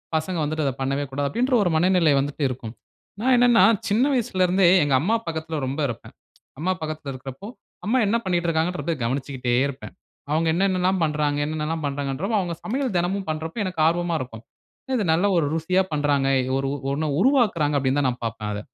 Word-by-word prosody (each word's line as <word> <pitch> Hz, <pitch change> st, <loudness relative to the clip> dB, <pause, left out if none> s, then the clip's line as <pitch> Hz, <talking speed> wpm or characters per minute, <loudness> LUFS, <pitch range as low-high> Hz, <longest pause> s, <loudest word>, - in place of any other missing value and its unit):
பசங்க 165 Hz, +3 st, -1 dB
வந்துட்டு 155 Hz, +1 st, -1 dB
அத 135 Hz, -, +1 dB
பண்ணவே 135 Hz, +2 st, -1 dB
கூடாது. 140 Hz, +1 st, -2 dB
அப்பிடின்ற, 250 Hz, +3 st, +1 dB
ஒரு 175 Hz, -, +1 dB
மனநிலைய 170 Hz, -3 st, +3 dB
வந்துட்டு 145 Hz, +1 st, -3 dB
இருக்கும். 120 Hz, -3 st, -6 dB, 0.5 s
நான் 260 Hz, +1 st, +3 dB
என்னென்னா, 240 Hz, -1 st, +5 dB, 0.2 s
சின்ன 220 Hz, +5 st, +2 dB
வயசுல 215 Hz, -7 st, +1 dB
இருந்தே 185 Hz, 0 st, +3 dB, 0.2 s
எங்க 145 Hz, -2 st, 0 dB
அம்மா 220 Hz, +7 st, +1 dB
பக்கத்தில 160 Hz, -1 st, -4 dB
ரொம்ப 140 Hz, +4 st, -4 dB
இருப்பேன். 120 Hz, -, -8 dB, 0.5 s
அம்மா 185 Hz, +4 st, 0 dB
பக்கத்தில 155 Hz, -3 st, -5 dB
இருக்குறப்போ, 135 Hz, +9 st, -9 dB, 0.4 s
அம்மா 240 Hz, +5 st, +2 dB
என்ன 225 Hz, -, +1 dB
பண்ணிக்கிட்ருக்காங்கன்றத 170 Hz, -2 st, 0 dB
கவனிச்சுக்கிட்டே 130 Hz, 0 st, -2 dB
இருப்பேன். 135 Hz, -1 st, -8 dB, 0.4 s
அவுங்க 160 Hz, +1 st, +1 dB
என்னென்னலாம் 185 Hz, 0 st, +1 dB
பண்றாங்க, 150 Hz, -1 st, 0 dB
என்னென்னலாம் 155 Hz, 0 st, -3 dB
பணறாங்கன்றப்ப, 145 Hz, +9 st, -2 dB
அவுங்க 175 Hz, -3 st, -3 dB
சமையல் 255 Hz, -1 st, -2 dB
தினமும் 190 Hz, +2 st, -1 dB
பண்றப்ப, 160 Hz, +7 st, -3 dB
எனக்கு 180 Hz, -4 st, -3 dB
ஆர்வமா 175 Hz, 0 st, 0 dB
இருக்கும். 115 Hz, -3 st, -8 dB, 0.5 s
இது 210 Hz, -, 0 dB
நல்ல 175 Hz, +5 st, +2 dB
ஒரு 155 Hz, -, +2 dB
ருசியா 180 Hz, +4 st, +1 dB
பண்றாங்க. 145 Hz, -2 st, +1 dB, 0.3 s
ஒரு 135 Hz, 0 st, -1 dB, 0.3 s
ஒன்ன 155 Hz, +1 st, -1 dB
உருவாக்குறாங்க 200 Hz, -, +2 dB
அப்பிடின்னு 135 Hz, +1 st, +1 dB
தான் 135 Hz, -, +2 dB
நான் 125 Hz, -1 st, -6 dB
பாப்பேன் 110 Hz, -1 st, -4 dB
அத. 105 Hz, -, -4 dB
160 Hz, 170 wpm, -23 LUFS, 140-185 Hz, 0.5 s, என்னென்னா